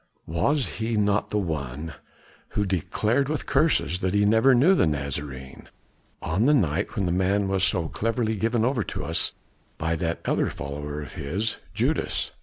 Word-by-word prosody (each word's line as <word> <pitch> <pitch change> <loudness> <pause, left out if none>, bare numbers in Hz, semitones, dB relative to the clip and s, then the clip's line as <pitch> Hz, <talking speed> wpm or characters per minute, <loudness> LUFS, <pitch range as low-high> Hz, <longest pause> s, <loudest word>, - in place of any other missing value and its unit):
"Was 125 - +1
he 110 0 0
not 105 0 +1
the 105 - -1
one 80 -4 -3 0.6
who 105 - +2
declared 110 - 0
with 155 - -2
curses 150 - +2
that 95 +1 -1
he 105 0 +4
never 110 +5 +5
knew 150 +11 +5
the 185 - +3
Nazarene, 70 -2 -4 0.5
on 95 +10 +1
the 150 - +6
night 80 - 0
when 100 - 0
the 85 - 0
man 95 +2 +1
was 95 -1 0
so 90 -4 +1
cleverly 115 +2 -1
given 115 +2 +1
over 130 -2 +1
to - - -4
us - - 0 0.4
by 80 +1 -1
that 85 0 -2
other - - +1
follower 75 +1 -5
of - - -10
his, 95 +8 -2 0.2
Judas?" - - 0
95 Hz, 170 wpm, -25 LUFS, 80-115 Hz, 0.6 s, the